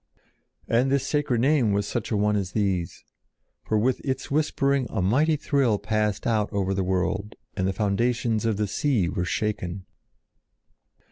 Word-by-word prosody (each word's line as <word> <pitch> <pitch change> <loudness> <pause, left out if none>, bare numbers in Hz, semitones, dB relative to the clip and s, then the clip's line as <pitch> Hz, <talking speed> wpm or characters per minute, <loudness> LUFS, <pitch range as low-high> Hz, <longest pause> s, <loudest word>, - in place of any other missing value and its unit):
And 125 +3 +2
this 140 -2 +1
sacred 145 -6 0
name 130 -6 +3
was 100 0 0
such 110 +1 -3
a 110 - 0
one 105 +1 +2
as 95 -2 -2
these; 95 -5 -1 0.6
for 110 - 0
with 125 +4 +1
its 135 0 -3
whispering 140 -3 +1
a - - -3
mighty 135 - +3
thrill 140 -7 +1
passed 105 0 -1
out 110 -3 +1
over 95 -2 0
the 95 0 0
world 95 +3 -1 0.2
and 95 -2 0
the - - +1
foundations 110 +3 0
of 110 -3 0
the 105 - +1
sea 115 - 0
were 90 -2 -2
shaken. 95 -2 -3
105 Hz, 160 wpm, -25 LUFS, 100-130 Hz, 0.6 s, name